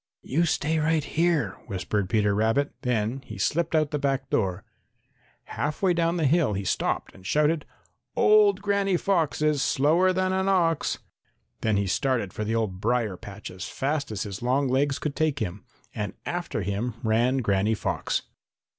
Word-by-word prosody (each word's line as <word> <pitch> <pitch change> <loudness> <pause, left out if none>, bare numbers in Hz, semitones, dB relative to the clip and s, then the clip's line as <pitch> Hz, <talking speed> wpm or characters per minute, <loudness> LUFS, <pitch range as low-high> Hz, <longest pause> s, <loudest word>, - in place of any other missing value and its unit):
"You 165 +6 +1
stay 160 0 0
right 155 0 +2
here," 160 - 0
whispered 100 0 -2
Peter 105 0 +2
Rabbit. 115 +7 +1
Then 120 +1 -1
he 110 -4 -9
slipped 165 - 0
out 155 -2 +2
the 150 - -1
back 135 -1 -1
door. 95 -2 0 0.8
Half 150 +5 -4
way 185 -2 +4
down 170 0 +1
the 160 - +1
hill 145 -5 +3
he 100 0 -2
stopped - - -1
and 95 - -16
shouted: 150 - +1 0.5
"Old 205 -2 +5
Granny 200 -2 +2
Fox 165 -6 0
Is 150 -2 +2
slower 165 +9 +3
than 185 0 0
an 190 +1 +1
ox!" 170 -5 +2 0.6
Then 110 -2 +1
he 100 - +1
started 115 0 0
for 110 - -3
the 110 +2 -1
old 100 -5 -2
brier 115 -3 +1
patch 105 0 -9
as 90 0 -7
fast 140 -1 -2
as 105 - -2
his 100 -2 -6
long 130 +3 +1
legs 135 +2 +1
could 150 -2 -3
take 155 -3 +1
him, 100 -5 -4 0.3
and - - -3
after - - -3
him 105 +4 -2
ran 120 +4 +2
Granny 105 -2 +1
Fox. - - -2
135 Hz, 170 wpm, -26 LUFS, 105-160 Hz, 0.8 s, Old